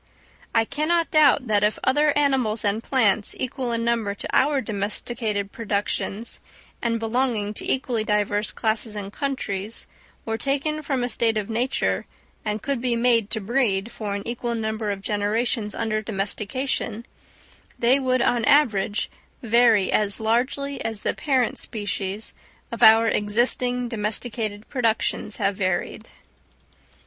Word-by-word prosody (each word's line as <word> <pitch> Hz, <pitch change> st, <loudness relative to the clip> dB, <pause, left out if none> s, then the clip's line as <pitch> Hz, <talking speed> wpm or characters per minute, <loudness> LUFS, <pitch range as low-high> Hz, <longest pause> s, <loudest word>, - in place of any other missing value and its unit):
I 225 Hz, 0 st, +4 dB
cannot 315 Hz, +6 st, 0 dB
doubt 290 Hz, -4 st, +5 dB
that 210 Hz, -3 st, +2 dB
if 210 Hz, +1 st, +2 dB
other 295 Hz, +3 st, +3 dB
animals 260 Hz, -7 st, +1 dB
and 205 Hz, +2 st, +1 dB
plants, 220 Hz, -5 st, +1 dB
equal 255 Hz, -1 st, -3 dB
in 230 Hz, 0 st, -1 dB
number 230 Hz, -4 st, 0 dB
to -, -, -6 dB
our 285 Hz, 0 st, +3 dB
domesticated 210 Hz, -1 st, -2 dB
productions, 210 Hz, 0 st, -2 dB, 0.4 s
and 230 Hz, -1 st, 0 dB
belonging 225 Hz, -2 st, 0 dB
to -, -, -3 dB
equally 245 Hz, -4 st, 0 dB
diverse 210 Hz, 0 st, 0 dB
classes 220 Hz, 0 st, -2 dB
and 200 Hz, -1 st, -6 dB
countries, 225 Hz, -7 st, -3 dB, 0.4 s
were 225 Hz, 0 st, -2 dB
taken 285 Hz, +4 st, -1 dB
from 270 Hz, -4 st, -1 dB
a -, -, 0 dB
state 225 Hz, -1 st, +1 dB
of 210 Hz, +1 st, -3 dB
nature, 245 Hz, +4 st, 0 dB, 0.4 s
and 210 Hz, 0 st, -3 dB
could 275 Hz, -4 st, -1 dB
be 245 Hz, -1 st, +1 dB
made 230 Hz, -3 st, +2 dB
to 220 Hz, -, +2 dB
breed 220 Hz, -1 st, 0 dB
for 205 Hz, -2 st, -4 dB
an 200 Hz, -, -5 dB
equal 235 Hz, 0 st, -3 dB
number 220 Hz, -1 st, -2 dB
of 195 Hz, -1 st, -4 dB
generations 210 Hz, +1 st, -1 dB
under 215 Hz, -1 st, -1 dB
domestication, 215 Hz, +3 st, -2 dB, 0.7 s
they 250 Hz, +4 st, +4 dB
would 255 Hz, -2 st, +1 dB
on 245 Hz, -, +2 dB
an 230 Hz, -, -1 dB
average 220 Hz, -7 st, +3 dB, 0.4 s
vary 230 Hz, -3 st, +4 dB
as 205 Hz, 0 st, +1 dB
largely 255 Hz, +5 st, 0 dB
as 225 Hz, -2 st, -4 dB
the -, -, +1 dB
parent 260 Hz, -5 st, 0 dB
species 205 Hz, -1 st, -3 dB, 0.4 s
of 235 Hz, -, -6 dB
our 225 Hz, +1 st, +8 dB
existing 245 Hz, +4 st, +2 dB
domesticated 215 Hz, -1 st, -2 dB
productions 225 Hz, -4 st, 0 dB
have 195 Hz, 0 st, 0 dB
varied. 190 Hz, +3 st, -2 dB
225 Hz, 140 wpm, -24 LUFS, 210-250 Hz, 0.7 s, our